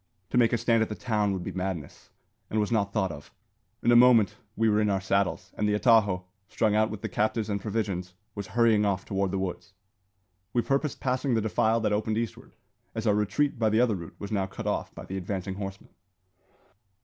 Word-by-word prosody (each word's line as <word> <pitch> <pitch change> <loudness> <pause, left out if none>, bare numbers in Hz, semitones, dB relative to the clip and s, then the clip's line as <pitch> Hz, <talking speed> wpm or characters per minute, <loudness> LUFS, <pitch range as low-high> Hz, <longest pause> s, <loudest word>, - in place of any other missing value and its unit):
To - - +1
make 115 -2 +4
a 120 - +2
stand 115 0 +2
at 110 - 0
the 105 - -4
town 105 -5 0
would 95 -2 -3
be - - -4
madness, 90 -6 -5 0.4
and 110 - 0
was 105 +2 0
not 100 -3 +1
thought 95 -4 0
of. 75 -2 -10 0.5
In 120 - +4
a - - +6
moment 115 -4 +6 0.2
we 115 - +2
were 105 0 +3
in 105 - +2
our 100 -1 +1
saddles; 100 0 -1
and 105 0 0
the 105 - +2
atajo, 105 -5 +4 0.3
strung 110 -2 +1
out 110 0 +3
with 105 -1 -7
the - - -1
captives 110 0 -1
and 100 -1 -2
provisions, 95 -5 -3 0.2
was 100 -2 -6
hurrying 115 -3 +4
off 100 -2 0
toward 95 -1 -1
the 95 - -2
woods. 95 +1 -4 0.8
We 120 - +2
purposed 140 +1 -1
passing 130 0 0
the - - +3
defile 110 +1 +1
that 105 - +1
opened 110 +1 0
eastward, 115 -1 -5 0.4
as 110 0 -3
our 105 - +4
retreat 105 +7 0
by 110 -2 +3
the 110 +1 +2
other 120 -2 +3
route 85 -4 -7
was 100 - -7
now 100 -3 0
cut 95 - -8
off - - -1
by - - -8
the 95 - -5
advancing 95 +1 -3
horsemen. 95 -1 -7
105 Hz, 220 wpm, -27 LUFS, 95-115 Hz, 0.8 s, a